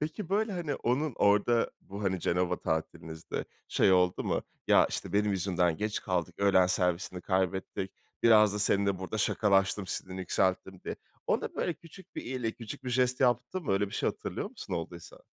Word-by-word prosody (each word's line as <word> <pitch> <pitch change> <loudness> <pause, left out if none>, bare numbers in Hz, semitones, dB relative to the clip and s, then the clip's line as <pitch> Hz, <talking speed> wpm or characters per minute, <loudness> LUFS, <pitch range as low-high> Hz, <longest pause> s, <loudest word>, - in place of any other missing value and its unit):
Peki, 155 +4 -4
böyle, 210 +2 +1
hani, 170 -6 -2
onun 130 +2 0
orada 105 +3 +3
bu, 100 +2 -8
hani, 95 -2 0
Cenova 90 +1 0
tatilinizde 80 0 -3 0.2
şey 95 - +4
oldu 90 -1 +3
mu? - - 0 0.2
"Ya, - - +6
işte - - -4
benim 105 +1 +2
yüzümden 90 -3 +1
geç 105 0 -2
kaldık, 90 -2 -2
öğlen 95 -2 +5
servisini 90 0 0
kaybettik, 95 0 -1 0.3
biraz 105 -3 +6
da - - -2
seninle 100 -2 +2
burada 95 -3 -4
şakalaştım, 95 -1 +2
sinirini 95 +1 -4
yükselttim." 95 0 0
diye. - - -4 0.3
Ona - - 0
böyle 175 - -1
küçük 170 +5 -16
bir - - -3
iyilik, 125 -3 -3
küçük 125 +4 -8
bir 125 - -3
jest 125 +1 +1
yaptın 125 +8 +1
mı? 125 - 0
Öyle 100 +1 +2
bir - - -8
şey - - +1
hatırlıyor - - -4
musun, - - -6
olduysa? 85 0 -7
100 Hz, 175 wpm, -30 LUFS, 90-120 Hz, 0.3 s, Ya